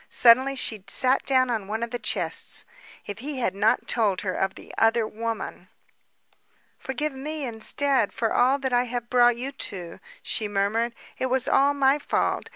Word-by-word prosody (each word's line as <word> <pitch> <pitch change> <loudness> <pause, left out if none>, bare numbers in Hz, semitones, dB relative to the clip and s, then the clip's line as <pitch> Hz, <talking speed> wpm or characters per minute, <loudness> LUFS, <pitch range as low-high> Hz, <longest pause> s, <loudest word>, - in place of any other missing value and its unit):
Suddenly 260 +3 +5
she 220 -6 -3
sat 255 +6 +1
down 255 -2 +3
upon 215 -4 -2
one 220 +2 -3
of 235 - -4
the 245 - -3
chests. - - -1 0.4
If 205 +1 -7
he 280 +3 -5
had 235 -7 0
not 205 +3 +1
told 210 -5 +1
her 185 -2 -2
of 190 +1 -1
the - - -12
other 225 0 +3
woman! 225 +1 -5 1.1
"Forgive 275 +3 -3
me 295 +2 -5
instead, 250 +1 0
for 225 -1 -1
all 260 +3 +3
that 265 -2 -3
I 245 +1 +3
have 240 -1 -5
brought 245 -1 +5
you 260 +3 -4
to," 185 -10 -6 0.2
she 215 - -1
murmured. 210 +4 0 0.2
"It 260 - 0
was 260 0 0
all 280 +1 +3
my 275 +1 +3
fault. - - -1
240 Hz, 175 wpm, -25 LUFS, 220-265 Hz, 1.1 s, Suddenly